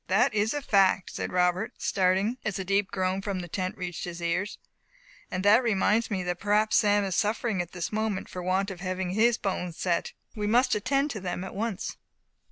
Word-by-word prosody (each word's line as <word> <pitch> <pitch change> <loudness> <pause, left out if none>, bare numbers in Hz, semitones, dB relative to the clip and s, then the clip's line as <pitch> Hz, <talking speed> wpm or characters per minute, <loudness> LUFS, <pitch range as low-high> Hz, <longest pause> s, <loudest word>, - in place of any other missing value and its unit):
"That 225 +7 +3
is 215 +4 +1
a 290 - -3
fact," 195 -5 +3
said - - -4
Robert, 180 +3 +1
starting, 190 +5 +1
as 210 - -2
a 190 - -4
deep 195 +1 +1
groan 185 0 -1
from 195 -1 -3
the 175 - -7
tent 185 +3 -3
reached 180 -3 -4
his 175 -1 -6
ears; 175 +4 -1 0.7
"and 185 +1 -3
that 215 +4 +7
reminds 225 0 +2
me 190 -4 -1
that 180 -1 -3
perhaps 210 +1 +3
Sam 205 -1 +3
is 190 -2 -2
suffering 215 -2 0
at 175 -1 -7
this 180 -2 -3
moment 215 -2 -1
for 180 - -7
the 180 - -6
want 195 +2 +1
of 185 - -8
having 185 -1 -2
his 230 +4 +3
bones 180 -3 -3
set. 175 -2 -1 0.2
We 210 -1 -2
must 245 +5 +3
attend 275 +7 +1
to 215 - -4
them 180 -1 -4
at 190 - -7
once." 210 -1 -3
195 Hz, 210 wpm, -27 LUFS, 185-215 Hz, 0.7 s, that